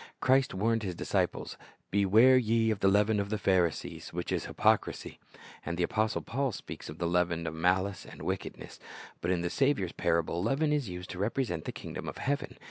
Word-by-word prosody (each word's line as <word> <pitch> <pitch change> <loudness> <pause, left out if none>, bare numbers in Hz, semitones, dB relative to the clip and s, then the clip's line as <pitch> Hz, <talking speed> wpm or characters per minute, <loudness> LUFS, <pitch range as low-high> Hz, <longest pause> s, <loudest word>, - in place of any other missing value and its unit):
Christ 130 -2 +3
warned 115 +3 +1
His 95 -4 -4
disciples, - - -1 0.3
"Beware 105 +6 +6
ye 115 -2 +3
of 105 - -2
the 95 - +3
leaven 105 +2 +3
of 100 0 -2
the 110 - -1
Pharisees, 90 -5 0
which - - -4
is - - -1
hypocrisy." - - 0 0.4
And 85 +1 -4
the 90 - +1
apostle 110 +4 0
Paul 135 +2 -1
speaks - - -8
of 75 - -8
the 85 - -2
"leaven 85 -1 +1
of 80 - -3
malice 90 +3 +1
and - - -11
wickedness."^ - - -5 0.4
But 85 - -2
in 90 -2 +1
the 85 0 -2
Saviour's 135 -11 +1
parable, 85 0 0
leaven 140 - +1
is 140 -8 -1
used 90 0 -7
to 90 - -7
represent 105 - -1
the - - -3
kingdom - - -6
of - - -8
heaven. 145 +1 -2
100 Hz, 195 wpm, -30 LUFS, 90-115 Hz, 0.4 s, Beware